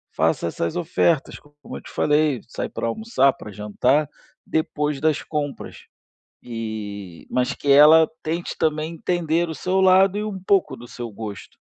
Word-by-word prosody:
Faça -, -, +1 dB
essas 85 Hz, 0 st, -3 dB
ofertas, 170 Hz, -3 st, 0 dB
co 145 Hz, 0 st, -24 dB
como -, -, -8 dB
eu -, -, -10 dB
te -, -, -13 dB
falei. 150 Hz, -3 st, +2 dB
Sai -, -, -5 dB
pra -, -, -4 dB
almoçar, 140 Hz, -, +2 dB
pra 105 Hz, -, -11 dB
jantar, 125 Hz, +9 st, +1 dB, 0.4 s
depois 150 Hz, -2 st, -1 dB
das 155 Hz, -1 st, +1 dB
compras. 145 Hz, -2 st, -4 dB, 0.7 s
E 105 Hz, -6 st, -7 dB
mas 125 Hz, 0 st, 0 dB
que 145 Hz, -, -2 dB
ela 155 Hz, +3 st, +8 dB, 0.2 s
tente 165 Hz, +2 st, -3 dB
também 155 Hz, 0 st, 0 dB
entender 170 Hz, 0 st, 0 dB
o 160 Hz, -, -5 dB
seu 185 Hz, +4 st, 0 dB
lado 190 Hz, +1 st, +5 dB
e -, -, -2 dB
um 210 Hz, -3 st, -4 dB
pouco 195 Hz, 0 st, +1 dB
do 120 Hz, -, -11 dB
seu 120 Hz, -1 st, -7 dB
gosto. 105 Hz, -1 st, -8 dB
150 Hz, 165 wpm, -22 LUFS, 120-170 Hz, 0.7 s, ela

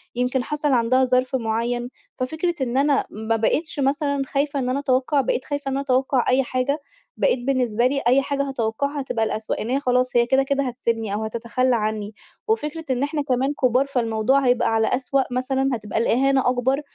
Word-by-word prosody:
يمكن 250 Hz, +1 st, 0 dB
حصل 295 Hz, +1 st, -1 dB
عندها 255 Hz, +1 st, +3 dB
ظرف 255 Hz, +1 st, +1 dB
معيّن، 240 Hz, +1 st, -1 dB, 0.3 s
ففكرة 315 Hz, +7 st, -1 dB
إن 255 Hz, 0 st, -1 dB
أنا 280 Hz, 0 st, +2 dB
ما 220 Hz, +2 st, -2 dB
بقيتش 295 Hz, +8 st, -1 dB
مثلًا 280 Hz, +1 st, 0 dB
خايفة 280 Hz, +1 st, -1 dB
إن 250 Hz, -, -1 dB
أنا 260 Hz, +2 st, 0 dB
اتوقع 275 Hz, +1 st, +1 dB
بقيت 255 Hz, -, -1 dB
خايفة 285 Hz, -2 st, -3 dB
إن 265 Hz, -, -2 dB
أنا 275 Hz, -, -1 dB
اتوقع 260 Hz, -1 st, +1 dB
أي 260 Hz, +1 st, +3 dB
حاجة، 255 Hz, +4 st, -1 dB, 0.4 s
بقيت -, -, +2 dB
بالنسبة 245 Hz, -2 st, +1 dB
لي 275 Hz, +1 st, -1 dB
أي 260 Hz, +3 st, +5 dB
حاجة 280 Hz, 0 st, -1 dB
هاتوقعها 270 Hz, +4 st, -2 dB
هتبقى 230 Hz, -4 st, -1 dB
الأسوء، 215 Hz, 0 st, -3 dB
إن 225 Hz, -, -4 dB
هي 265 Hz, +2 st, +1 dB
خلاص 250 Hz, -2 st, +1 dB
هي 240 Hz, 0 st, +5 dB
كده 265 Hz, +3 st, +3 dB
كده 280 Hz, 0 st, 0 dB
هتسبني 230 Hz, -4 st, -2 dB
أو 215 Hz, +1 st, -2 dB
هتتخلّى 235 Hz, +3 st, 0 dB
عنّي، 215 Hz, -1 st, -2 dB, 0.3 s
وفكرة 325 Hz, -7 st, -2 dB
إن 255 Hz, +1 st, 0 dB
احنا 295 Hz, +1 st, -1 dB
كمان 270 Hz, 0 st, 0 dB
كُبار 255 Hz, 0 st, +2 dB
فالموضوع 245 Hz, +1 st, +1 dB
هيبقى 245 Hz, -2 st, +2 dB
على 220 Hz, 0 st, +2 dB
أسوأ 270 Hz, +1 st, 0 dB
مثلًا 265 Hz, +2 st, 0 dB
هتبقى 215 Hz, -2 st, -4 dB
الإهانة 265 Hz, +3 st, +2 dB
أكبر، 255 Hz, +3 st, +1 dB
255 Hz, 190 wpm, -22 LUFS, 240-275 Hz, 0.4 s, أي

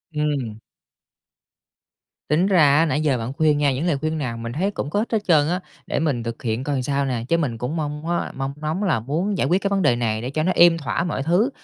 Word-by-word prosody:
Ừm. 140 Hz, -8 st, -2 dB, 1.7 s
Tính 155 Hz, +5 st, +2 dB
ra 155 Hz, -8 st, +5 dB
á, 165 Hz, -, +4 dB
nãy 155 Hz, -1 st, 0 dB
giờ 145 Hz, -4 st, +2 dB
bạn 115 Hz, +3 st, -4 dB
khuyên 150 Hz, 0 st, +2 dB
nha, 145 Hz, -2 st, +2 dB
những 135 Hz, +6 st, -2 dB
lời 160 Hz, -5 st, +1 dB
khuyên 155 Hz, +3 st, -2 dB
nào 125 Hz, -6 st, -3 dB
mình 115 Hz, 0 st, -5 dB
thấy 190 Hz, +8 st, 0 dB
cũng 145 Hz, -, -4 dB
có 205 Hz, -, 0 dB
ích 225 Hz, -, -3 dB
hết 225 Hz, -, +2 dB
trơn 150 Hz, -4 st, +4 dB
á. 180 Hz, +1 st, 0 dB, 0.3 s
Để -, -, -1 dB
mình 140 Hz, -7 st, 0 dB
thực 115 Hz, 0 st, -6 dB
hiện 115 Hz, +1 st, -1 dB
coi 140 Hz, -2 st, -1 dB
sao 140 Hz, +1 st, 0 dB
nè, 125 Hz, -4 st, -2 dB
chứ 170 Hz, -, +2 dB
mình 135 Hz, -8 st, -1 dB
cũng 125 Hz, +7 st, -3 dB
mong 150 Hz, 0 st, -4 dB
á, 175 Hz, 0 st, -1 dB
mong 135 Hz, 0 st, -3 dB
ngóng 155 Hz, +6 st, -2 dB
là 170 Hz, -, +2 dB
muốn 165 Hz, -, -2 dB
giải -, -, +1 dB
quyết 185 Hz, +3 st, +2 dB
cái 200 Hz, -, 0 dB
vấn 200 Hz, -1 st, +1 dB
đề 145 Hz, -8 st, +3 dB
này 110 Hz, -2 st, -1 dB
để 125 Hz, -, -4 dB
cho 155 Hz, +3 st, -1 dB
nó 185 Hz, -, +2 dB
êm 170 Hz, -1 st, +6 dB
thỏa 160 Hz, +2 st, -2 dB
mọi 160 Hz, -6 st, -2 dB
thứ, 180 Hz, -, +2 dB
150 Hz, 260 wpm, -22 LUFS, 130-170 Hz, 1.7 s, êm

